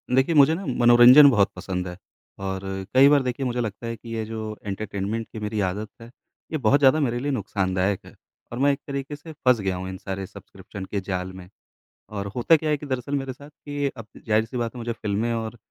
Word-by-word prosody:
देखिए, 130 +5 +3
मुझे 145 +1 +6
ना 195 - -6
मनोरंजन 125 +2 +8
बहुत 105 -6 +3
पसंद 90 0 -4
है, 90 0 -7 0.4
और 95 -1 -3 0.3
कई 130 +2 +7
बार 145 -1 +5
देखिए, 125 +2 -2
मुझे 125 -1 -1
लगता 110 +1 -5
है 115 - -3
कि 115 +1 -13
ये 110 - -2
जो 110 -1 -5
एंटरटेनमेंट 100 +2 -3
की 110 - -6
मेरी 105 0 -3
आदत 105 +3 -5
है, 115 - -10 0.4
ये 160 - 0
बहुत 140 0 +3
ज़्यादा 140 +2 +5
मेरे 120 -5 0
लिए 145 +3 -2
नुकसानदायक 95 -5 -1
है, - - -14 0.4
और 120 - -5
मैं 140 +1 +4
एक 140 - -5
तरीके 140 +1 -4
से 155 +3 -11
फँस 125 -5 +2
गया 95 -2 -1
हूँ 95 +1 -5
इन 95 - -6
सारे 95 0 -5
सब्सक्रिप्शन 95 +1 -10
के 100 +1 -3
जाल 90 0 -2
में। 90 -1 -11 0.7
और 100 0 -3
होता 125 +7 +5
क्या 155 0 -1
है 150 - +2
कि 150 - -9
दरअसल 130 +1 -3
मेरे 135 -2 -3
साथ 140 +3 -14
कि 145 -1 -4
अब 115 - -8 0.2
ज़ाहिर-सी 110 +3 +1
बात 115 0 -3
है, - - -7
मुझे 120 0 -3
फ़िल्में 110 +1 -2
और 115 0 -4
115 Hz, 225 wpm, -24 LUFS, 100-135 Hz, 0.7 s, मनोरंजन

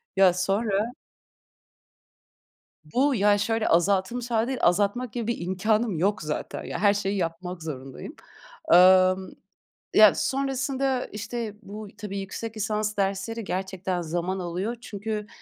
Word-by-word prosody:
Ya, 190 -2 +6
sonra 200 +4 0 1.9
Bu, 260 - +1
ya, 205 0 +4
şöyle 225 +1 0
azaltılmış 200 +8 +1
hâli 225 0 +2
değil, 260 -2 -3
azaltmak 205 +6 +1
gibi 235 -2 -3
bir 235 - -1
imkânım 210 +2 0
yok 195 -2 +1
zaten. 150 0 -4
Ya - - -5
her 205 0 +4
şeyi 200 0 -1
yapmak 170 0 -4
zorundayım. 135 -4 -7 0.6
Emm 185 +1 +6 0.7
ya 215 -2 +8
sonrasında 270 -1 -1
işte 215 +1 -5
bu 210 0 -9
y - - -21
tabii 205 -2 -5
yüksek 220 +3 -6
lisans 215 0 -1
dersleri 200 +3 -1
gerçekten 190 -1 -3
zaman 175 +3 -2
alıyor 185 +7 -3
çünkü 210 +1 -5
200 Hz, 130 wpm, -26 LUFS, 185-225 Hz, 1.9 s, ya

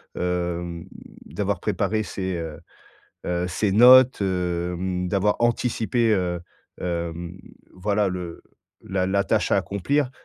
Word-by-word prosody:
hem, 85 -1 -2 0.4
d'avoir 100 -3 -2
préparé 105 +1 0
ces, 95 -3 -4
heu 80 -2 -6 0.7
heu, 90 0 -1
ces 95 +2 0
notes, 125 +2 +7
hem, 90 0 -1
d'avoir 100 +2 +1
anticipé, 120 -1 +1
heu, 90 -3 0 0.4
hem, 85 0 -4 0.4
voilà 100 +2 0
le 90 -2 -6 0.4
la 95 -1 -1
la 100 +1 +1
tâche - - +1
à - - +4
accomplir, 130 +7 0
95 Hz, 115 wpm, -24 LUFS, 90-105 Hz, 0.7 s, notes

